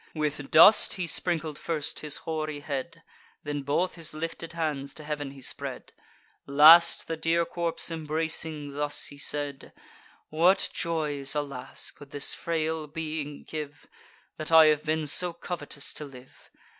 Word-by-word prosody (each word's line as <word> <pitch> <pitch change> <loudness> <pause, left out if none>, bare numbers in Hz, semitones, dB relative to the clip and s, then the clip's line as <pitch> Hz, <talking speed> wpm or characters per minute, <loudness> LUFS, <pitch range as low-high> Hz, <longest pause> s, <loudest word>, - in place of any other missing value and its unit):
With 150 -2 -3
dust 165 +7 +7
he 185 -3 -3
sprinkled 160 -3 -1
first 155 -4 -2
his 150 -1 -3
hoary 155 -2 -3
head; 150 +3 -5 0.4
Then 145 -1 -3
both 145 +7 0
his 165 -2 -6
lifted 165 +1 -5
hands 150 -4 -3
to 155 - -7
heav'n 150 -2 -4
he 135 -1 -12
spread; - - -5 0.5
Last, 160 +4 +7
the 165 - -2
dear 165 +1 +1
corpse 170 0 -1
embracing, 155 -1 -2
thus 145 +1 0
he 140 - -5
said: 145 -1 -2 0.6
"What 175 +5 +3
joys, 150 -5 -1
alas! 140 -3 -4
could 145 - -15
this 145 -1 0
frail 160 -1 -2
being 155 -1 -5
give, 145 -2 -7 0.5
That 155 +1 -4
I 160 -1 +9
have 150 - -6
been 155 0 -1
so 175 +4 +1
covetous 160 -4 -5
to 150 - -6
live? 130 -2 -15
155 Hz, 145 wpm, -27 LUFS, 145-165 Hz, 0.6 s, I